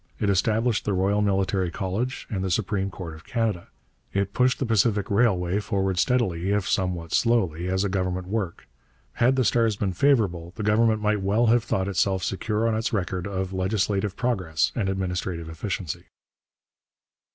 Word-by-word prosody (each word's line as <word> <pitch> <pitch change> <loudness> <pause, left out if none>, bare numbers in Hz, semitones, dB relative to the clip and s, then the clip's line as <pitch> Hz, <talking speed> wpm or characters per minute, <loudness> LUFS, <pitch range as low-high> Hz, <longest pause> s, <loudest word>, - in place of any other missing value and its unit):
It 100 - +2
established 110 +3 +1
the 105 - 0
Royal 100 +3 +2
Military 95 -2 +1
College 100 +8 -3
and 95 -6 -3
the 95 - -1
Supreme 95 +1 0
Court 90 -4 -7
of 80 - -12
Canada. 110 -7 -2 0.4
It 100 0 -1
pushed 125 +1 +3
the 135 - -1
Pacific 110 -2 +1
Railway 100 -4 +2
forward 95 -3 -1
steadily, 95 -9 +1
if 100 -1 +1
somewhat 90 -4 -1
slowly, 95 -8 +1
as 95 +1 +1
a - - +1
government 95 -1 -2
work. 95 -4 -3 0.5
Had 125 +3 +3
the 130 -2 +2
stars 115 -2 +2
been 100 -2 -2
favourable, 90 -9 +1
the 105 - -4
Government 110 +1 +3
might 105 -1 +1
well 105 +5 +2
have 120 -2 +3
thought 95 0 -1
itself 95 0 +1
secure 105 +3 -1
on 115 - +1
its 110 +1 -1
record 90 -3 -2
of 95 -1 -3
legislative 95 +1 0
progress 95 -11 0
and 100 -4 -1
administrative 90 -3 -3
efficiency. 85 0 -4
100 Hz, 165 wpm, -25 LUFS, 95-110 Hz, 0.5 s, pushed